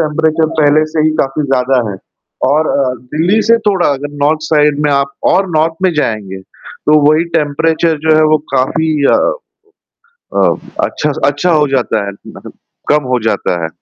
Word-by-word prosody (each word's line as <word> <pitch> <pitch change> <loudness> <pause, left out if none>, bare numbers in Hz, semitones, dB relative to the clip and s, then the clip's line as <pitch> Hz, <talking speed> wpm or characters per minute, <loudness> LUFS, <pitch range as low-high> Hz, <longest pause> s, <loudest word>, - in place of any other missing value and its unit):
Temperature 160 +1 +1
पहले 150 +1 +3
से 160 - 0
ही 155 - +3
काफ़ी 135 +3 -2
ज़्यादा 130 -3 0
है 95 - -6 0.5
और 155 +2 +1
अ, 130 -2 0 0.2
दिल्ली 180 +8 +2
से 230 - +5
थोड़ा 190 -3 +1
अगर 145 +1 -3
नॉर्थ 155 +2 +1
साइड 150 -2 +2
में - - +1
आप 140 0 0 0.2
और 195 +1 +1
नॉर्थ 160 +1 +1
में 185 -2 +2
जाएँगे, 110 -9 -2
तो 150 +9 -2
वही 155 +2 +2
टेंपरेचर 160 +2 0
जो 155 - +5
है 155 - +4
वो - - +3 0.2
काफ़ी 160 +5 0 0.2
अ - - +5 1.2
अ, - - +3 0.4
अच्छा 150 - -2 0.3
स - - -3
हो 150 -1 +2
जाता 110 -5 -1
है, 100 - -5 0.2
मतलब - - -11 0.4
कम 150 0 +2
हो 125 - +2
जाता 100 -5 -1
है। - - -1
150 Hz, 175 wpm, -13 LUFS, 135-160 Hz, 1.2 s, से